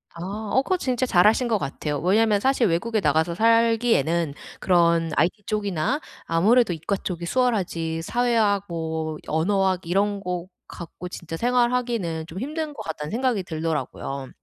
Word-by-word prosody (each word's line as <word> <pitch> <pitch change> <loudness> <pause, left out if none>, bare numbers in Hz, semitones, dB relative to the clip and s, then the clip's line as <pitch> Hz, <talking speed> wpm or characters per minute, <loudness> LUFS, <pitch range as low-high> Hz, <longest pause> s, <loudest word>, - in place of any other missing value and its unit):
아. 200 +5 -5
어 265 - +4
그거 370 +5 0
진짜 255 -4 0
잘 180 -4 +4
하신 240 +3 +3
것 225 -2 +2
같아요. 145 -3 -3
왜냐면 210 +4 +3
사실 260 -2 +2
외국에 215 +6 0
나가서 160 +1 +1
살기에는 225 - +2 0.3
그런 170 -2 +3
IT 180 +7 +1
쪽이나 210 - -1 0.3
아무래도 200 +5 +3
이과 165 +5 -2
쪽이 175 -2 -5
수월하지, 170 -8 0
사회학 220 -2 +1
뭐 160 -2 -3
언어학 190 +3 +1
이런 200 +4 +1
거 180 -2 -4 0.2
갖고 175 +1 -9
진짜 165 -2 -7
생활하기는 240 -8 0
좀 175 +4 -7
힘든 305 +3 -4
거 - - -8
같다는 150 -2 -5
생각이 240 -4 0
들더라구요. 155 -5 -4
190 Hz, 335 characters per minute, -24 LUFS, 165-230 Hz, 0.3 s, 어